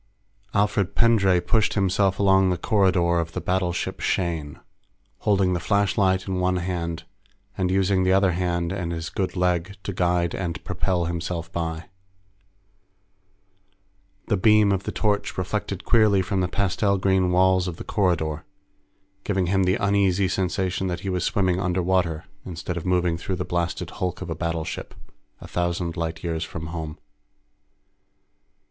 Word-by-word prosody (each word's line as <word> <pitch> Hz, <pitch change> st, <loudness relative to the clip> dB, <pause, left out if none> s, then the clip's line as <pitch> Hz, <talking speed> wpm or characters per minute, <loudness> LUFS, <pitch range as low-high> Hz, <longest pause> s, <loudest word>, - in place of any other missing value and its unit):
_ -, -, +4 dB
Alfred 100 Hz, -2 st, +1 dB
Pendray 100 Hz, -6 st, +4 dB
pushed 110 Hz, +4 st, +1 dB
himself 95 Hz, -1 st, +2 dB
along 95 Hz, -1 st, +4 dB
the 90 Hz, -, 0 dB
corridor 90 Hz, -3 st, +2 dB
of 85 Hz, 0 st, -3 dB
the -, -, -2 dB
battleship 90 Hz, -1 st, -1 dB
Shane, 80 Hz, -5 st, -2 dB, 0.6 s
holding 95 Hz, -3 st, +2 dB
the 90 Hz, -, 0 dB
flashlight 95 Hz, -1 st, +1 dB
in 95 Hz, -1 st, -1 dB
one 90 Hz, 0 st, +1 dB
hand 85 Hz, -2 st, -3 dB, 0.5 s
and 95 Hz, -1 st, 0 dB
using 95 Hz, 0 st, +2 dB
the 95 Hz, -, +2 dB
other 95 Hz, 0 st, +4 dB
hand 85 Hz, -1 st, -1 dB
and 90 Hz, -3 st, -3 dB
his 80 Hz, -1 st, -4 dB
good 95 Hz, -2 st, -2 dB
leg 90 Hz, +1 st, 0 dB
to 100 Hz, -, -4 dB
guide 90 Hz, -1 st, +1 dB
and 85 Hz, -3 st, -4 dB
propel 90 Hz, -1 st, -1 dB
himself 85 Hz, 0 st, -4 dB
by. 80 Hz, -1 st, -3 dB, 2.4 s
The 105 Hz, -, +1 dB
beam 105 Hz, +1 st, +5 dB
of 95 Hz, -1 st, -1 dB
the -, -, -2 dB
torch 105 Hz, -1 st, -1 dB
reflected 100 Hz, 0 st, -3 dB
queerly 105 Hz, -5 st, +4 dB
from 95 Hz, +1 st, -1 dB
the 90 Hz, -, +1 dB
pastel 100 Hz, +2 st, +1 dB
green 95 Hz, -1 st, +2 dB
walls 95 Hz, 0 st, +3 dB
of 85 Hz, -2 st, -5 dB
the -, -, -7 dB
corridor, 80 Hz, -6 st, 0 dB, 0.8 s
giving 95 Hz, -3 st, 0 dB
him 95 Hz, -1 st, +3 dB
the 90 Hz, +1 st, +3 dB
uneasy 100 Hz, -2 st, +2 dB
sensation 95 Hz, 0 st, -1 dB
that 90 Hz, -1 st, -3 dB
he 95 Hz, -, -3 dB
was 90 Hz, -2 st, -1 dB
swimming 95 Hz, -2 st, +1 dB
underwater 90 Hz, -3 st, 0 dB, 0.2 s
instead 90 Hz, 0 st, -5 dB
of 85 Hz, +1 st, -5 dB
moving 90 Hz, -2 st, +1 dB
through 95 Hz, -, -3 dB
the 90 Hz, 0 st, -3 dB
blasted 85 Hz, -1 st, -2 dB
hulk 90 Hz, -1 st, -3 dB
of 85 Hz, -, -6 dB
a -, -, -2 dB
battleship, 85 Hz, -1 st, -4 dB, 0.4 s
a -, -, -10 dB
thousand 85 Hz, -1 st, -2 dB
light 80 Hz, -1 st, -4 dB
years 80 Hz, -2 st, -2 dB
from 80 Hz, -, -6 dB
home. 80 Hz, -2 st, -5 dB
90 Hz, 155 wpm, -24 LUFS, 85-95 Hz, 2.4 s, beam